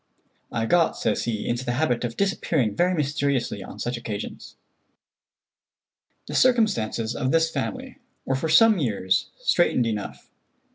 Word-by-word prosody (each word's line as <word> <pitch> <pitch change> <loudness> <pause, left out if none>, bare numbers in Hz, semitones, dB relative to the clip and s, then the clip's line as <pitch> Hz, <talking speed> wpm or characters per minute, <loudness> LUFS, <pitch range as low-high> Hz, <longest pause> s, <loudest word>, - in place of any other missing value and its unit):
"I 115 - -1
got," 170 +6 +2
says - - -1
he, 110 -3 -3
"into 120 +1 -1
the 120 -1 -2
habit 125 -3 0
of 120 -1 -4
disappearing 160 - 0
very 180 +1 +2
mysteriously 140 -4 -1
on - - -10
such 120 0 -3
occasions." 105 -3 -7 1.7
The - - -8
circumstances 200 - +2
of 130 - -1
this 165 0 +2
family 260 +6 -5 0.3
were 135 - 0
for 135 +5 -1
some 215 +5 +6
years 100 -8 0
straitened 175 - +2
enough. 105 -3 -5
135 Hz, 140 wpm, -24 LUFS, 115-175 Hz, 1.7 s, some